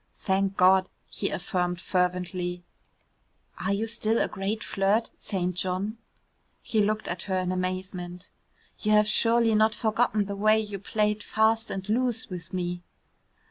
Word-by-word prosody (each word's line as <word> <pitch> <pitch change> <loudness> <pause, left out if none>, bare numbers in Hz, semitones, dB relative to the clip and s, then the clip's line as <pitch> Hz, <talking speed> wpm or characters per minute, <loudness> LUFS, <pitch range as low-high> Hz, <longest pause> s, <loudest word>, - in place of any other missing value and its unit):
"Thank 195 0 0
God," 185 +1 +5 0.2
he - - -2
affirmed 180 -2 -2
fervently. 180 -1 -1 1.0
"Are 185 +2 -1
you 200 +3 0
still 225 0 +1
a - - +2
great 205 +3 -3
flirt, 205 +3 +1
St. 180 -3 -2
John?" 190 +5 -2 0.6
He 220 -3 +1
looked 215 +1 0
at 175 0 -3
her 190 - +1
in 185 -1 -1
amazement. 185 -1 -4 0.5
"You 215 0 +1
have 210 0 +6
surely 230 +1 +3
not 215 +1 +3
forgotten 220 -1 +1
the 200 0 -4
way 215 +2 +4
you 205 -2 -4
played 210 +1 0
fast 220 +2 +1
and 190 0 -5
loose 235 +1 0
with 175 -1 -7
me?" 175 -1 -3
195 Hz, 145 wpm, -27 LUFS, 185-215 Hz, 1.0 s, have